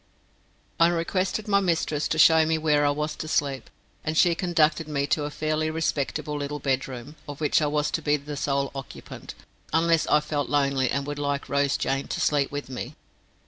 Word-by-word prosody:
I 165 - +7
requested 185 +5 -1
my 200 -1 +4
mistress 165 -5 0
to 155 - -1
show 160 0 +7
me 160 0 +1
where 150 -2 +2
I - - +3
was 150 +1 -2
to 155 - -5
sleep, 140 -3 -1 0.3
and 155 +1 -2
she 175 0 +5
conducted 165 -2 +1
me 140 -2 -1
to 145 +1 0
a - - -3
fairly 155 +1 -1
respectable 155 -1 -2
little 145 0 -3
bedroom, 135 0 -3
of 145 - -7
which 155 +1 +2
I 150 - +2
was 150 0 0
to 165 - -1
be 150 0 +2 0.2
sole 140 -1 -1
occupant, 135 0 -9 0.4
unless 165 0 +2
I 150 - +4
felt 150 -1 -3
lonely 140 -3 +1
and 140 0 -1
would 145 0 -5
like 145 -1 -2
Rose 140 +1 +1
Jane 135 0 -1
to - - -3
sleep 145 -2 +1
with 145 0 -5
me. 130 +2 -6
150 Hz, 190 wpm, -25 LUFS, 140-160 Hz, 0.4 s, I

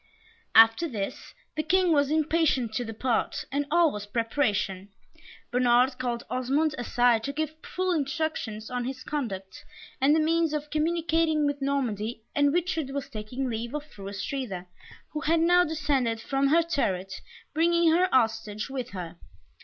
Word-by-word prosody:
After 225 +9 +7
this, 210 -9 -5 0.2
the 310 - 0
King 360 +3 +2
was 285 -3 +3
impatient 310 -6 +1
to 245 - -1
depart, 225 +1 -1
and 285 +1 -1
all 335 -1 +4
was 210 0 -6
preparation. 210 -4 -1 0.6
Bernard 250 +1 +3
called 240 -2 -2
Osmond 275 +5 0
aside 240 -2 +2
to 280 - -2
give 310 +1 -3
full 370 0 -2
instructions 285 -8 -2
on 245 -1 -2
his 255 0 -5
conduct, 195 -10 -5 0.4
and 285 +3 +5
the - - +3
means 325 0 +2
of 300 0 -4
communicating 320 -1 +1
with 285 -1 -1
Normandy, 240 -5 -2
and 285 0 +4
Richard 330 -3 -1
was 280 0 -4
taking 245 +3 -4
leave 235 +3 -4
of 300 - -3
Fru 200 -9 -9
Astrida, 200 -2 -4 0.5
who 305 - -3
had 325 +3 +2
now 355 +2 +5
descended 285 -8 0
from 270 +4 0
her 330 +4 +4
turret, 195 - -2 0.3
bringing 335 +1 +3
her 360 +3 +3
hostage 225 -2 0
with 255 -2 -4
her. 175 -5 -7
275 Hz, 155 wpm, -27 LUFS, 225-315 Hz, 0.6 s, After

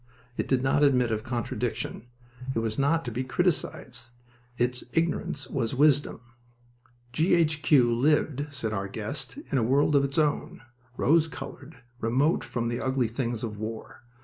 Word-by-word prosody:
It - - -2
did 130 -1 +1
not 135 +2 +2
admit 125 -5 +4
of 110 0 -1
contradiction. 120 -1 -3 0.5
It - - -1
was 115 0 -1
not 160 +3 +2
to 120 - -3
be 125 +3 -2
criticized. 130 -6 -1 0.5
Its 125 +1 0
ignorance 165 -3 -1
was 120 -3 -2
wisdom. 145 -3 +3 0.9
G. 165 +6 +3
H. 155 -3 +2
Q. 125 -7 +4
lived, 145 +2 +1
said 115 -6 -4
our 100 -2 -2
guest, 110 - -5
in 135 - +2
a - - +1
world 140 +5 +3
of 140 - +5
its 140 +2 -2
own, 150 -5 0 0.3
rose 160 +4 +4
colored, 145 -2 -9 0.2
remote 130 +8 +2
from 120 -1 -3
the 120 +1 -2
ugly 130 -2 +1
things 115 0 -3
of 105 -3 -4
war. 110 +1 -6
130 Hz, 160 wpm, -27 LUFS, 115-145 Hz, 0.9 s, of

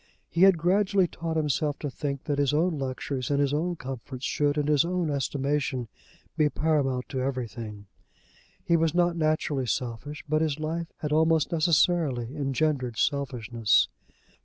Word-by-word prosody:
He 170 - 0
had 190 -2 +7
gradually 190 +3 +3
taught 165 -1 -4
himself 150 -1 0
to 145 - -4
think 140 +1 -4
that 145 -2 -1
his 140 0 +2
own 160 0 +1
luxuries 130 -1 -3
and 140 -1 +1
his 140 -1 +1
own 170 +4 0
comforts 130 -1 -7
should 145 -2 +1
in 150 - +1
his 150 -2 +4
own 175 -2 -1
estimation 140 -3 -1 0.5
be 155 -2 +3
paramount 145 -5 0
to 130 - -2
everything. 115 -5 -4 0.8
He 170 - +3
was 165 -1 +1
not 175 -1 +3
naturally 155 -4 0
selfish, 125 +6 -3
but 155 +1 +1
his 155 -2 0
life 165 +2 -3
had 150 - -2
almost 160 0 +3
necessarily 155 -6 +2
engendered 135 -4 -1
selfishness. 120 -2 +1
145 Hz, 155 wpm, -27 LUFS, 130-160 Hz, 0.8 s, had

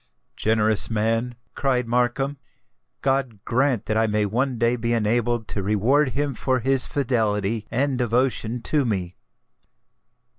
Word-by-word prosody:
"Generous 110 -1 +2
man;" 115 +2 0 0.2
cried 125 -3 0
Markham: 125 +4 0 0.7
"God 135 -6 -1
grant 130 -2 +1
that 110 - 0
I 110 0 +3
may 105 -1 +1
one 125 +5 -1
day 120 +1 +2
be 115 0 -1
enabled 115 0 0
to 100 - -3
reward 120 +8 +2
him 145 0 -1
for 130 +2 0
his 135 +2 +2
fidelity 110 -5 0
and 130 +2 0
devotion 120 -1 0
to 150 -2 +1
me!" 95 -7 -2
120 Hz, 135 wpm, -23 LUFS, 110-130 Hz, 0.7 s, I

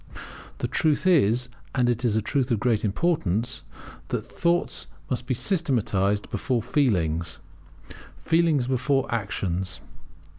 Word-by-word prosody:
The - - -2
truth 155 0 +1
is, 125 - +4 0.3
and 125 -2 +3
it 120 0 0
is 115 -4 +2
a 110 - +2
truth 130 +2 0
of 115 -4 +1
great 115 -3 +1
importance, 115 - 0 0.5
that - - -3
Thoughts 170 0 0 0.2
must 125 0 -2
be 130 - +1
systematized 110 - 0
before 120 +1 -1
Feelings, 85 - +1 0.8
Feelings 165 -5 +2
before 130 +2 +1
Actions. 95 -4 -1
120 Hz, 120 wpm, -25 LUFS, 105-140 Hz, 0.8 s, is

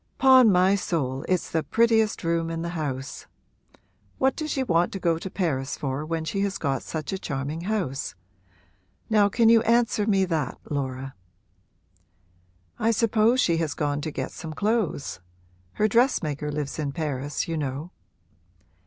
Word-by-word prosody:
''Pon 260 -3 +7
my 185 0 +4
soul, 145 -9 -1
it's 185 -2 0
the 160 - +1
prettiest 225 +1 +2
room 165 0 0
in 165 0 -3
the 170 - -3
house. 145 -4 -5 0.9
What 265 0 +2
does 310 -1 -4
she 270 -2 0
want 175 -7 +2
to 195 - -4
go 165 -3 +1
to 190 - -6
Paris 145 -9 -2
for 135 +1 -3
when 160 0 -3
she 195 +4 -2
has 200 -1 -1
got 135 -4 -1
such 160 +2 -5
a 190 - -3
charming 145 +2 -4
house? 150 - -2 1.0
Now 205 -2 +5
can 225 +2 +3
you 230 0 +7
answer 230 -2 +2
me 195 -3 +3
that, 165 -4 -2
Laura?' 135 -2 -3 1.7
'I 225 - +2
suppose 230 +2 +3
she 170 -7 +2
has 160 -3 -1
gone 145 -1 -1
to 155 - -3
get 135 -3 -4
some 160 -2 -7
clothes: 205 - -1 0.5
her 215 - +2
dressmaker 155 - +1
lives 145 0 -4
in 145 -2 -1
Paris, 145 -2 -3
you 165 - -2
know.' 145 +3 -4
165 Hz, 160 wpm, -25 LUFS, 145-210 Hz, 1.7 s, Pon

